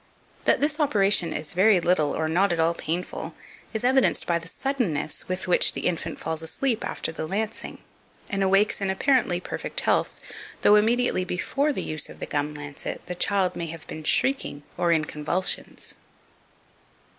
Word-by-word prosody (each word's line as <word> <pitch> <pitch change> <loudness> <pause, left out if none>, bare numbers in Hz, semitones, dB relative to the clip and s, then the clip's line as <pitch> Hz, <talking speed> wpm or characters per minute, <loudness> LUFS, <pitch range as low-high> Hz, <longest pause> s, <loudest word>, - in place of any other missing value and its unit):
That - - +4
this 300 +2 +1
operation 200 - +3
is 150 0 -4
very 195 +1 +5
little 170 -4 +2
or 160 - 0
not 180 +5 +2
at 170 - -1
all 165 +1 +3
painful, 170 +2 -4 0.4
is 220 0 -3
evidenced 260 +1 +3
by 170 -1 +1
the 165 - -9
suddenness 190 - -2
with 185 +1 -3
which 180 - +4
the - - -4
infant 170 - -2
falls 160 0 -3
asleep 230 +8 -1
after - - -3
the 160 -1 -5
lancing, 210 +5 -3 0.4
and 195 -2 -2
awakes 195 +2 +3
in 195 - 0
apparently 190 -3 +2
perfect - - -3
health, - - +1 0.4
though - - +7
immediately 225 -2 +3
before 275 - 0
the - - -3
use 155 -1 -1
of - - -12
the - - -4
gum 150 +1 -2
lancet, 145 -1 -6
the 180 - -4
child 190 +1 +1
may 170 - -3
have 165 0 -8
been 155 - -7
shrieking 155 - +1
or 175 -1 +1
in 160 -2 +3
convulsions. 155 +6 -2
180 Hz, 170 wpm, -25 LUFS, 160-210 Hz, 0.4 s, though